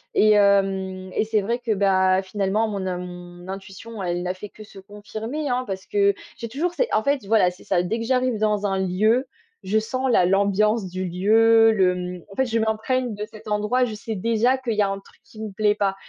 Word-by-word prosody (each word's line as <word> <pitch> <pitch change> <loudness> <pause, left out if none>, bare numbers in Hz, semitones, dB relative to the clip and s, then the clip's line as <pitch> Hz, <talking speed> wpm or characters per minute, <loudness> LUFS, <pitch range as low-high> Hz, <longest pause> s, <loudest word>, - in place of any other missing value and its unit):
Et 215 0 +5
hem 195 -2 +2
et - - 0
c'est 215 -1 +1
vrai 235 +5 -2
que, 235 -3 -1
bah, 190 -1 +3
finalement, 200 +3 0
mon 200 -3 -3
in 180 -1 -2
mon 175 0 -9
intuition 195 +3 -8
elle 175 -1 -2
n'a 180 0 -2
fait 195 +2 -9
que 215 - -13
se 200 -2 -14
confirmer, 215 +8 -6
hein. 250 +1 0
Parce 190 -1 -5
que 200 -1 +2 0.2
j'ai 230 - -6
toujours 320 +9 -2
c'est - - -1
en 215 - +2
fait, 280 -5 0
voilà, 210 -5 +4
c'est 180 - -16
ça: 180 -2 +1
dès 215 +6 -2
que 230 - -3
j'arrive 255 -2 +1
dans 210 -1 +1
un 195 -1 0
lieu, 215 +8 +1 0.3
je 210 +3 0
sens 255 +4 -1
la 180 - +4
l'ambiance 200 +2 +2
du 185 +1 -4
lieu, 225 +5 +4
le 190 -4 +3
mmh, 180 0 -5
en - - -11
fait 265 - +1
je 230 -2 -1
m'imprègne 225 +3 -1
de 210 +1 -5
cet 215 -1 -14
endroit, 210 +5 +1
je 225 - -5
sais 220 +1 -5
déjà 230 +5 +2
qu'il 255 -3 -3
y 210 - +1
a 200 - +3
un 195 0 -3
truc 195 - -22
qui 215 - -16
me 215 - -5
plaît 210 +1 +1
pas. 195 -2 0
210 Hz, 230 wpm, -23 LUFS, 190-225 Hz, 0.3 s, Et